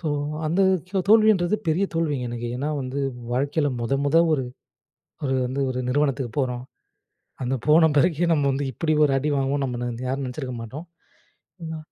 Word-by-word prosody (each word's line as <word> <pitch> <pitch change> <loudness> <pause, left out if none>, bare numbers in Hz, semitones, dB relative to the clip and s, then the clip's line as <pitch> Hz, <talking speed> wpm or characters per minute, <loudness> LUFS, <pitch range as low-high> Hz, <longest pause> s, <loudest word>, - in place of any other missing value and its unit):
So 165 - -5 0.4
அந்த 170 +5 +1 0.3
தோ 195 - +1
தோல்வின்றது 215 -3 +5
பெரிய 175 +5 +2
தோல்விங்க 145 -7 -1
எனக்கு. 120 0 -4
ஏனா 145 +4 -2
வந்து, 130 +2 -4 0.3
வாழ்க்கையில 145 +3 +1
மொத 135 +4 0
மொத 145 +3 +2 0.2
ஒரு 135 - -1 0.8
ஒரு 135 -1 0
வந்து 135 +3 -3
ஒரு 125 - -3
நிறுவனத்துக்கு 135 -2 0
போறோம். 125 -2 -1 0.8
அந்த 130 +2 -1
போன 160 +2 +6
பிறகு 165 +2 +3
நம்ம 145 -3 +2
வந்து 140 +1 -1
இப்டி 155 +6 0
ஒரு 135 - -1
அடி 150 +3 -2
வாங்குவோம்னு, 135 +1 0
நம்ம 120 0 -4
யாரும் 135 +1 -2
நெனைச்சிருக்க 130 0 -5
மாட்டோம். 145 +10 -8 0.8
ஆனா 160 0 -5
140 Hz, 160 wpm, -24 LUFS, 130-160 Hz, 0.8 s, போன